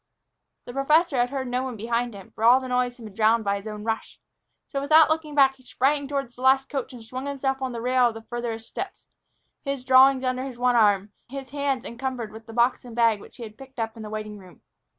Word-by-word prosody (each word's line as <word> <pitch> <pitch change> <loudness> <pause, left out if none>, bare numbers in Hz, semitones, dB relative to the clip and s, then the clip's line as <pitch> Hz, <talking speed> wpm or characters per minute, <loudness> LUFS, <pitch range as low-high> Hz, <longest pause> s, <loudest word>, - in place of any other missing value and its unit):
The 245 - -8
professor 300 +3 +3
had 245 0 +2
heard 265 -1 -3
no 250 +1 -1
one 260 -2 -4
behind 235 +1 -2
him, 195 -2 -12
for 220 - -7
all 245 +3 +7
noise 250 0 0
had 235 - -11
been 210 - -10
drowned 220 +2 +3
by 200 -1 0
his 200 +2 -9
own 210 -1 -6
rush. 225 0 -4 0.5
So, 275 - -3
without 310 +2 +6
looking 315 -2 -2
back, 270 -2 +5
he 255 - -22
sprang 280 +3 0
toward 275 -3 -3
the 245 - -14
last 265 +1 +4
coach 270 -2 -3
and 245 -3 -11
swung 255 +4 -6
himself 270 -1 -2
on 260 -1 -2
by 235 - -5
the - - -5
rail 250 0 +4
of 230 - -4
the 225 - -9
farther 240 -1 -4
steps, 375 - -7 0.6
his 275 -3 -4
drawings 265 0 +6
under 255 +1 -1
one 250 0 +3
arm, 205 -2 +3 0.2
his 270 -1 -7
hands 280 -3 -1
encumbered 245 -2 -4
with 220 +1 -12
the - - -9
box 240 +2 +2
and 240 -2 -10
bag 230 -3 +3
which - - -14
he 240 - -8
had 215 -1 -10
picked 270 0 -13
up 225 -1 -3
in 225 - -9
the 215 - -7
waiting 215 -1 -6
room. 185 -2 -17
250 Hz, 245 wpm, -25 LUFS, 225-270 Hz, 0.6 s, all